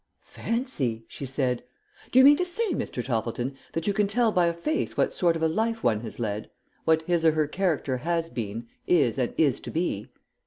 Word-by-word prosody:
"Fancy!" 140 - -2
she 140 - -7
said. 130 -2 -1 0.5
"Do - - +2
you 260 - +9
mean 290 +1 +8
to 360 - +1
say, 370 +4 -2
Mr. 125 - -3
Toppleton, 120 +2 -2 0.2
that 165 - -2
you 205 - +1
can 205 0 +2
tell 225 +2 +2
by 180 -3 +3
a 170 - +1
face 305 - -2
what - - +2
sort 170 -2 +2
of 165 - -2
a - - +5
life 225 +7 -1
one 110 -3 +3
has 115 -2 -7
led; 105 -2 -3 0.4
what 160 0 +3
his 170 0 +1
or 160 -1 +5
her 155 -1 +2
character 155 -5 0
has 165 +4 -1
been, 115 -5 -5 0.2
is, 140 -8 +3
and 125 - 0
is 145 -5 +3
to - - -8
be?" 155 - -2
160 Hz, 210 wpm, -26 LUFS, 125-195 Hz, 0.5 s, you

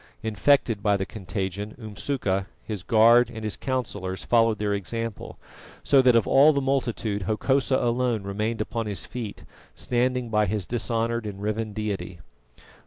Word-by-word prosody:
Infected 110 +1 +2
by 105 -1 +2
the 95 - -2
contagion, 100 0 -5
Umsuka, 105 -3 -2 0.2
his 105 -4 -5
guard 115 +5 +5
and 110 - -8
his 110 - -2
councillors 105 -8 -3
followed 115 -2 +3
their 105 0 -1
example, 115 +2 -4 0.5
so 140 -2 +5
that 125 -2 +5
of 115 - +4
all 145 +3 +6
the 140 - +1
multitude 120 -7 -1
Hokosa 130 +4 +1
alone 120 -2 0
remained 105 +3 -2
upon 115 0 -3
his 100 -2 -3
feet, 115 -4 -7 0.3
standing 125 0 -1
by 105 -1 +2
his 100 -1 -2
dishonoured 115 0 -1
and 100 -1 -7
riven 110 +1 -2
deity. 100 -4 -4
110 Hz, 150 wpm, -25 LUFS, 105-120 Hz, 0.5 s, all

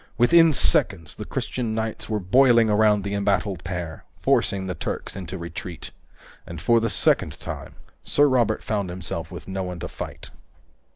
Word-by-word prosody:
Within 165 +7 +6
seconds, 80 - +2
the - - -7
Christian 115 -4 -3
knights 110 0 -4
were 110 -1 0
boiling 115 +3 +4
around 105 -1 +3
the 100 +1 -3
embattled 100 -2 0
pair, 85 -3 -5 0.2
forcing 95 -1 +1
the 95 - -3
Turks 85 - -5
into 95 0 -6
retreat. 85 0 -7 0.6
And 85 -1 -7
for 115 +7 +3
the 115 0 0
second 95 - +1
time, - - -7 0.3
Sir 145 0 +3
Robert 120 -5 +1
found 100 -4 -2
himself 90 -1 -5
with - - -9
no 95 0 -3
one 90 -2 -5
to - - -4
fight. - - -8
100 Hz, 165 wpm, -24 LUFS, 90-115 Hz, 0.6 s, Within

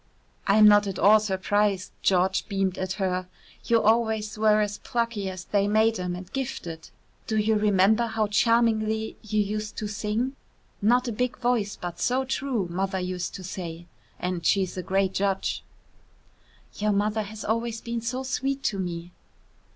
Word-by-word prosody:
"I'm 210 +1 +7
not 205 -1 +6
at 190 -2 -4
all 210 +3 +6
surprised." 205 -1 0
George 190 0 +2
beamed 195 -2 -1
at 185 0 -2
her. 185 -2 -1 0.4
"You 230 -1 +3
always 220 -1 +2
were 215 0 +4
as 210 0 -1
plucky 230 -5 -2
as 185 -1 -7
they 200 -1 +1
made 220 +1 +3
'em 180 -1 -2
and 180 0 -10
gifted. 205 -12 -5 0.4
Do 220 - 0
you 215 +1 +2
remember 210 +2 +3
how 220 -1 0
charmingly 220 0 +2
you 215 0 -1
used 210 +1 -2
to 215 - -3
sing? 215 +6 -2 0.5
'Not 245 +5 +3
a - - -1
big 250 +3 -1
voice, 235 -4 0
but 175 -1 -7
so 255 +2 +1
true,' 265 -5 -1
Mother 190 +1 -1
used 180 -1 -3
to 185 - -8
say, 175 -2 -6 0.3
and 180 -1 -3
she's 190 -1 +1
a 185 - -3
great 190 +1 0
judge." 195 -1 0 1.2
"Your 210 0 +2
mother 210 +2 +1
has 215 +1 -7
always 230 +1 -1
been 235 0 -4
so 250 +3 -3
sweet 270 +1 -2
to 200 - 0
me." 175 -1 -4
210 Hz, 165 wpm, -26 LUFS, 190-225 Hz, 1.2 s, I'm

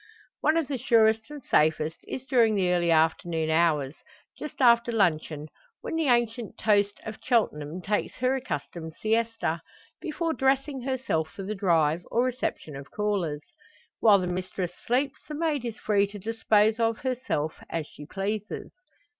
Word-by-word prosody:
One 310 +1 +3
of 325 -4 +1
the 275 -3 -3
surest 225 -1 +3
and 295 -3 -9
safest 155 -1 +2
is 260 - -5
during 235 -5 +3
the 185 -3 +2
early 175 -1 +1
afternoon 160 0 +2
hours, 160 -4 +2 0.4
just 300 - -8
after 235 -2 +5
luncheon, 155 -7 0 0.3
when - - -4
the 325 -2 +1
ancient 240 -2 +1
toast 205 -1 +2
of 220 -1 -6
Cheltenham 175 - 0
takes 205 +1 -1
her 255 +2 +1
accustomed 160 - -5
siesta 225 -6 0 0.4
before 330 0 -2
dressing 270 0 +1
herself 250 -12 -1
for 195 - -8
the 205 +3 -3
drive, 170 -5 +2
or 235 - +2
reception 250 - -3
of 140 0 -9
callers. 190 -8 -1 0.6
While 210 -3 +7
the 185 - -1
mistress 180 0 -3
sleeps 260 +8 -1
the 300 - -5
maid 300 -4 0
is 230 -2 -4
free 200 -1 +2
to 205 +1 -9
dispose 220 +1 +2
of 225 -1 +2
herself, 250 - -2
as 165 -2 -2
she 150 0 -12
pleases. 205 +3 -4
215 Hz, 155 wpm, -27 LUFS, 170-245 Hz, 0.6 s, While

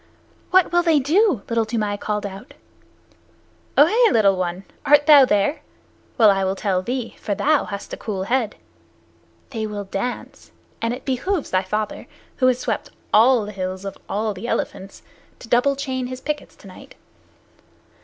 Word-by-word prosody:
"What 370 -2 +4
will 350 0 +4
they 330 -3 +3
do?" 310 - +2
Little 230 -1 +1
Toomai 215 -2 -2
called 210 0 -3
out. 200 +6 -9 1.2
"Ohe, 435 - +5
little 200 -3 +4
one. 180 0 -3 0.2
Art 290 0 +5
thou 285 -3 +8
there? 250 +7 +1 0.6
Well, 220 -3 +7
I 195 -1 0
will 190 0 0
tell 190 -2 0
thee, 245 +4 -4
for 205 - -2
thou 295 +6 +2
hast 200 -1 -7
a - - -4
cool 195 -4 -4
head. 235 0 -1 1.0
They 220 -4 -3
will 205 -1 -5
dance, 200 +5 -5 0.3
and 230 - 0
it 250 +2 -6
behooves 290 +6 -2
thy 185 - +2
father, 210 +3 -4 0.3
who 255 - +3
has 255 -1 +3
swept - - -3 0.2
all 230 0 +5
the 210 - -7
hills 185 -1 -5
of 195 - -5
all 215 +1 -1
the 200 +5 -7
elephants, 195 -4 -4 0.3
to - - -13
double 250 +4 +2
chain 260 -2 -3
his 255 0 -7
pickets 295 +2 -5
to - - -16
night." - - -14
230 Hz, 165 wpm, -21 LUFS, 200-275 Hz, 1.2 s, thou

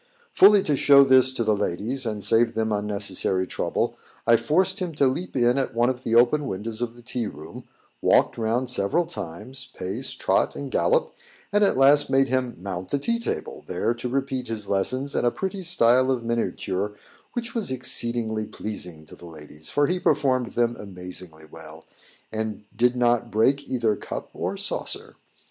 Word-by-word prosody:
Fully 200 0 +6
to 150 - +1
show 140 0 +7
this 130 -1 +5
to 120 - -1
the 110 -1 +2
ladies, 115 +8 -2
and 105 -2 -3
save 115 0 +3
them 110 0 0
unnecessary 100 -3 0
trouble, - - -2 0.3
I 115 - +6
forced 185 +10 +1
him 175 -4 -4
to 140 - +3
leap 140 +7 -2
in 125 +1 +3
at 135 - -3
one 120 +2 +3
of 125 -1 -7
the 115 - 0
open 130 +5 +4
windows 110 +3 -4
of 120 -1 -3
the 120 - -15
tea 120 -2 -2
room, 75 -3 -10 0.4
walked - - +3
round 115 +3 -1
several 125 +8 +1
times, 130 - -7
pace, 105 +9 -4
trot, - - 0
and - - -6
gallop, - - +1 0.4
and 205 0 +4
at 195 - +2
last 145 +2 +5
made 135 0 +3
him 130 -2 -1
mount 95 -1 -6
the 140 - 0
tea 235 +12 -1
table, 230 - -4
there 115 - 0
to 120 +1 -5
repeat 130 -1 -2
his 110 -3 -4
lessons 130 +9 -1
in - - +1
a 120 - +4
pretty 190 - -4
style 130 -7 +3
of 130 -3 0
miniature 105 -4 -2 0.4
which 235 -1 -4
was 225 - -1
exceedingly 120 -3 0
pleasing 90 -7 -6
to - - -13
the 85 - -13
ladies, 75 -1 -9
for 145 - +2
he 180 +4 -1
performed 130 -7 +1
them 120 0 +1
amazingly 90 -4 -8
well, 75 - -12 0.5
and 110 -1 -4
did 120 +3 +2
not 120 -1 +1
break 130 +7 +1
either 115 -4 +1
cup - - -7
or - - -3
saucer. - - -4
120 Hz, 180 wpm, -24 LUFS, 105-135 Hz, 0.5 s, show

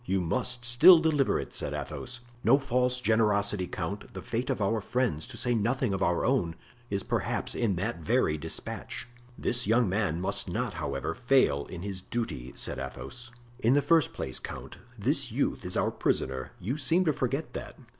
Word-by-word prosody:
"You 95 -4 0
must 120 +8 -1
still 150 +10 +9
deliver 155 -4 +2
it," - - -6
said - - -1
Athos. 120 -1 -5 0.2
"No 125 +5 +6
false 125 -2 +1
generosity, 105 -5 +2
count! - - -5
the - - -6
fate 125 +4 -2
of 130 - 0
our 110 +2 +1
friends, 120 - -1
to - - -8
say 120 - 0
nothing 120 +1 +1
of 95 - -2
our 85 0 +2
own, 110 -11 +1 0.3
is 100 -1 -1
perhaps - - -1
in 110 -6 +1
that 100 +4 -2
very 75 -1 +2
despatch." 75 - -4 0.3
"This 120 -2 +1
young 115 +1 +4
man 95 -4 0
must 95 - -1
not, - - -2
however, 70 +3 -3
fail 125 - +2
in 90 -1 -7
his 100 -2 -4
duty," 95 - -4
said - - -2
Athos. 65 - -6 0.3
"In 120 0 +4
the 145 - +5
first 165 -4 +4
place, - - -3
count, - - -8 0.2
this 130 +3 0
youth 135 +6 0
is 90 - -2
our - - +2
prisoner; 65 -1 -1
you 125 +11 -3
seem 170 +6 +2
to 155 - +3
forget 135 +4 -2
that. - - -7
115 Hz, 185 wpm, -29 LUFS, 95-130 Hz, 0.3 s, still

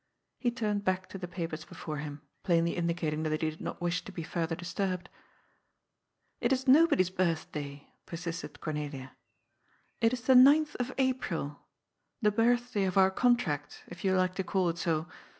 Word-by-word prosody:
He 245 - +1
turned 215 -4 -1
back 185 -1 0
to 195 - -7
the 180 - -5
papers 165 -3 -5
before 155 -1 -6
him, 145 0 -6 0.2
plainly 170 -2 +2
indicating 170 -3 -1
that 155 0 -1
he 155 - +1
did 155 - -13
not - - -5
wish 175 +1 0
to - - -9
be 175 -3 -5
further 165 0 -2
disturbed. 180 +1 -3 1.3
"It 240 - +1
is 260 0 0
nobody's 260 - +5
birthday," 155 -6 -2 0.2
persisted 165 -4 -6
Cornelia. 145 -4 -5 0.8
"It 225 0 +3
is 250 -1 -3
the 260 +3 +4
ninth 290 +4 +7
of 245 +1 -2
April. 250 - -1 0.6
The 210 -3 +3
birthday 235 -1 +2
of 185 0 -1
our 190 0 +6
contract, 190 - 0
if 175 - -10
you 190 -1 +2
like 185 0 +2
to 190 - -2
call 185 -1 +1
it 170 0 -3
so. 160 -1 0
180 Hz, 170 wpm, -30 LUFS, 160-220 Hz, 1.3 s, ninth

